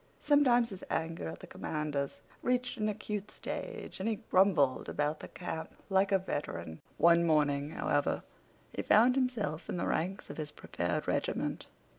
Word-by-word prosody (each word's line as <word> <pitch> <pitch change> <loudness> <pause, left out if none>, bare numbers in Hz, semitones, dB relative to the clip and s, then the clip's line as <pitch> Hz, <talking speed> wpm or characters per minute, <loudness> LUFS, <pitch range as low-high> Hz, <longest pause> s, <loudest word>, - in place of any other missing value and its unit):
Sometimes 245 -6 +4
his 190 - -8
anger 165 - -2
at 80 - -8
the - - -8
commanders 150 -3 -3 0.2
reached 250 0 0
an 215 0 +1
acute 210 -1 -4
stage, 470 - -6
and 200 +4 0
he 220 - -3
grumbled 175 -9 +4
about 150 +1 0
the - - -8
camp 160 -3 -6 0.2
like 195 +1 +4
a 195 - +6
veteran. 85 - -4 0.2
One 170 0 +6
morning, 145 -3 +2
however, 145 -2 0 0.5
he - - -2
found 235 +4 +6
himself 230 - -1
in - - -2
the - - -1
ranks 185 +5 -1
of - - -9
his 155 -2 -3
prepared 85 -11 -3
regiment. - - -1
175 Hz, 160 wpm, -32 LUFS, 150-215 Hz, 0.5 s, a